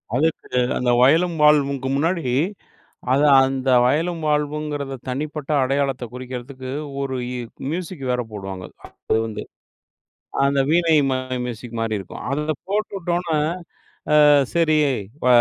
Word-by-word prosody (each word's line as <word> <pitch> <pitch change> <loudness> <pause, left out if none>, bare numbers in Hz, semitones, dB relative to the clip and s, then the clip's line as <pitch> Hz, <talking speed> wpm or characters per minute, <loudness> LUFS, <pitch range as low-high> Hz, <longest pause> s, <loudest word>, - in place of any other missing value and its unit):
அதுக்கு 160 +5 0 0.3
அந்த 125 -1 +1
வயலும் 165 +6 +4
வாழ்வும்க்கு 140 -3 +3
முன்னாடி 165 +4 0 0.9
அத 140 - +3 0.2
அந்த 135 0 -2 0.2
வயலும் 165 +5 0
வாழ்வுங்கிறத 150 -2 -2
தனிப்பட்ட 150 +2 -4
அடையாளத்த 135 -1 0
குறிக்கிறதுக்கு 130 +1 -7 0.3
ஒரு 135 -1 -2 0.6
மியூசிக் 170 -4 -5
வேற 125 0 0
போடுவாங்க 95 -3 -6 0.2
அப்பயிலருந்தே. 110 -1 -2 1.0
அந்த 140 0 +2
வீணை 165 -1 +3 0.2
மாரி 130 0 -2
மியூசிக் 120 0 -7
மாரி 115 -1 -1
இருக்கும். 95 - -9
அத 140 +2 0 0.3
போட்டுவிட்ட 200 -3 -2
உடனே, 165 -3 -1 0.9
"ஆ - - +7 0.3
சரி 165 -2 +3 0.4
இப்ப 150 - -3
140 Hz, 115 wpm, -22 LUFS, 130-160 Hz, 1.0 s, ஆ